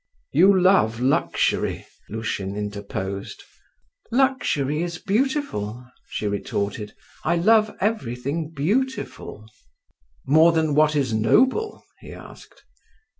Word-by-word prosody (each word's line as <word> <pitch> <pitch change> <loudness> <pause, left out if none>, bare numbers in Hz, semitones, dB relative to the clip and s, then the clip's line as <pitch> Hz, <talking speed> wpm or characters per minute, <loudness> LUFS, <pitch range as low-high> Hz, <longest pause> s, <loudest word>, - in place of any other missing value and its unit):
"You 190 +5 +5
love 180 - +3
luxury?" 130 +3 0 0.2
Lushin 100 -3 -4
interposed. 100 -1 -5 0.7
"Luxury 225 - +1
is 170 -1 -3
beautiful," 200 - -2 0.2
she - - -4
retorted; 100 +1 -3 0.3
"I 170 - +1
love 215 +5 +3
everything 155 - -2
beautiful." 185 - -3 0.8
"More 160 +4 +5
than 160 -2 +1
what 155 +1 +3
is 135 -6 0
noble?" 260 - +2 0.2
he - - -11
asked. - - -14
155 Hz, 95 wpm, -23 LUFS, -, 0.8 s, You